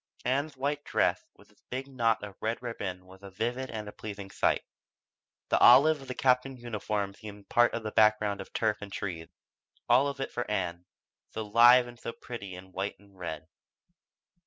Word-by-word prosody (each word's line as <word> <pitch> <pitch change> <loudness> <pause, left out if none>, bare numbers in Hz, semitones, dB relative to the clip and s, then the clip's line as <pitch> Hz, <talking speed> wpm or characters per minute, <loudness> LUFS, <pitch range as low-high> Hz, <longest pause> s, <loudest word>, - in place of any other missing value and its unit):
Ann's 140 +3 0
white 145 +2 -1
dress - - +1
with - - -20
its - - -29
big 130 +2 -4
knot 115 -5 +1
of 100 -2 -7
red 110 +1 -1
ribbon 95 -6 -5
was 95 +1 -16
a 100 - -10
vivid 120 +7 -3
and 110 -2 -5
a - - -6
pleasing 100 -2 -8
spot. - - +1 0.9
The - - +3
olive 140 +5 +7
of 135 - -11
the 130 - -5
Captain's 130 0 +2
uniform 105 -3 -2
seemed 105 -1 -11
part 120 0 +4
of 115 - -4
the 110 - -4
background 105 -2 +3
of - - -11
turf 110 -2 0
and 100 -1 -8
trees 85 -5 -5 0.6
all 130 +4 +5
of 140 -1 -4
it - - -3
for 120 - -4
Ann, 90 -4 -2 0.4
so 110 - -5
live 120 +4 +7
and 120 -1 -12
so 115 - -5
pretty 100 -6 -8
in 95 +1 -12
white 95 +2 -3
and 100 0 -22
red. 80 -4 -6
110 Hz, 190 wpm, -29 LUFS, 100-125 Hz, 0.9 s, olive